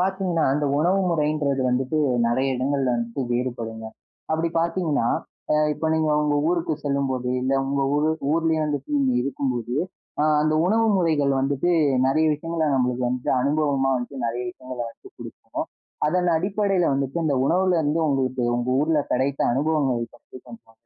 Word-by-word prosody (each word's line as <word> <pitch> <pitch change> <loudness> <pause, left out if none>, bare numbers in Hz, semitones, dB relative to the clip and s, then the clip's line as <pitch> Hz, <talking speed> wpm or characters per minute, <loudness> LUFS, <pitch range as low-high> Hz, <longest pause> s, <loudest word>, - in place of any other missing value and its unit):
பாத்தீங்கன்னா, 185 -3 0
அந்த 150 +1 0
உணவு 180 +5 +2
முறைன்றது 150 -3 0
வந்துட்டு 130 +4 0 0.3
நிறைய 130 +3 +1
இடங்கள்ல 130 -1 0
வந்துட்டு 120 +3 -3
வேறுபடுங்க. 120 -2 -3 0.5
அப்பிடி 160 +1 +1
பாத்தீங்கன்னா, 165 -6 0 0.5
அ - - +4 0.2
இப்ப 160 - -3
நீங்க 160 -1 +1
உங்க 150 -1 +1
ஊருக்கு 170 -2 0
செல்லும்போது, 135 -3 -1
இல்ல 130 +1 0
உங்க 140 0 0
ஊரு 150 +2 +2 0.2
ஊர்லயே 160 -1 +1
வந்துட்டு 145 -1 -3 0.3
இருக்கும்போது, 125 -2 -2 0.5
அ - - +3 0.2
அந்த 155 0 +1
உணவு 225 +4 +3
முறைகள் 155 -6 +2
வந்துட்டு 140 +5 0 0.4
நிறைய 155 +4 +2
விஷயங்கள 165 +1 -2
நம்மளுக்கு 125 -1 0
வந்து 125 0 -2
அனுபவமா 140 -1 +1
வந்து 130 +2 -6
நிறைய 120 +2 -3
விஷயங்கள 130 0 -9
வந்து - - -16
குடுக்கும். - - -7 0.4
அதன் 180 +2 +1
அடிப்படையில 195 0 +1
வந்துட்டு 135 +3 -2
இந்த 145 - +1
உணவுல 180 +3 +2
இருந்து 155 +2 0
உங்களுக்கு 130 -2 0
உங்க 120 +1 -2
ஊர்ல 155 +1 +2
கிடைத்த 135 +2 0
அனுபவங்கள 140 -3 +1 0.2
பற்றி - - -15
கொஞ்சம். 115 -1 -14
145 Hz, 145 wpm, -23 LUFS, 130-160 Hz, 0.5 s, அ